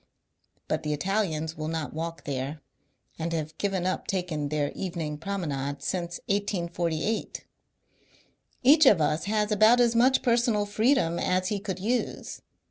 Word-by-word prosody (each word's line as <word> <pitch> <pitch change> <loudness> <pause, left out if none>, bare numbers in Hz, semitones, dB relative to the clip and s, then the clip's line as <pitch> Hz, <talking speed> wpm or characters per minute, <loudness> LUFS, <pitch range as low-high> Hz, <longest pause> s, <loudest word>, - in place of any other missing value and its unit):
But 155 - -1
the 150 -1 -2
Italians 160 -2 -1
will 155 0 -4
not 160 -2 -3
walk 165 +1 -5
there, 140 +2 -4 0.6
and 165 +1 -2
have 155 -1 -3
given 195 -3 -1
up 185 - -2
their 150 -6 -1
evening 165 -5 -4
promenade 145 -7 -3
since 175 +1 -3
1848. 175 -1 -2 1.2
E^h 295 +1 +8
of 195 - +2
us 155 +1 +1
has 210 +1 0
abont 215 +4 +5
as 235 -1 +3
much 255 +3 +4
personal 235 -4 +2
freedom 215 -4 +2
as 185 0 +1
he 205 - -1
could 190 -2 -4
use. 230 +6 -2
180 Hz, 135 wpm, -27 LUFS, 155-210 Hz, 1.2 s, E^h